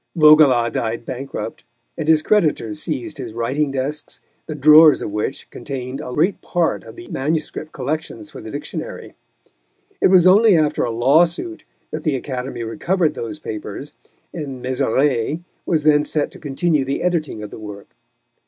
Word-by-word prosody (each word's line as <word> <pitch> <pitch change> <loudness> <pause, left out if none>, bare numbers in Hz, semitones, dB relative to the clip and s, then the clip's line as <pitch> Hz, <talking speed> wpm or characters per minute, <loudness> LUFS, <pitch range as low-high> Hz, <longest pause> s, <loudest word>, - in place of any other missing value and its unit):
Vaugelas 150 -7 +6
died 115 0 -3
bankrupt, 135 - -6 0.3
and 155 - -4
his 160 -1 +4
creditors 150 - +1
seized 140 -7 -4
his - - -6
writing 130 +6 -1
desks, 135 +3 -4 0.3
the 155 - -5
drawers 155 +1 +7
of - - -4
which 105 +6 -3
contained 135 0 -6
a 125 - -7
great 170 +9 +1
part 175 -2 -1
of - - -12
the 355 0 -11
MS. 155 +3 -2 0.2
collections 155 - -5
for - - -9
the - - -9
Dictionary. - - -7 0.9
It - - +6
was 185 -2 +5
only 200 +1 +6
after 150 -1 +1
a - - -1
lawsuit 165 - +1 0.3
that - - -4
the 155 -4 0
Academy 130 -2 -4
recovered 160 +7 0
those 120 +2 -6
papers, 110 +1 -7 0.4
and 135 -6 -6
Mézeray 135 +3 0 0.2
was 160 -4 +1
then 150 -1 +4
set 150 -1 -1
to - - -13
continue 150 +1 0
the 135 +1 -3
editing 160 -11 -1
of 105 - -8
the - - -9
work. 105 -2 -10
150 Hz, 160 wpm, -20 LUFS, 125-160 Hz, 0.9 s, drawers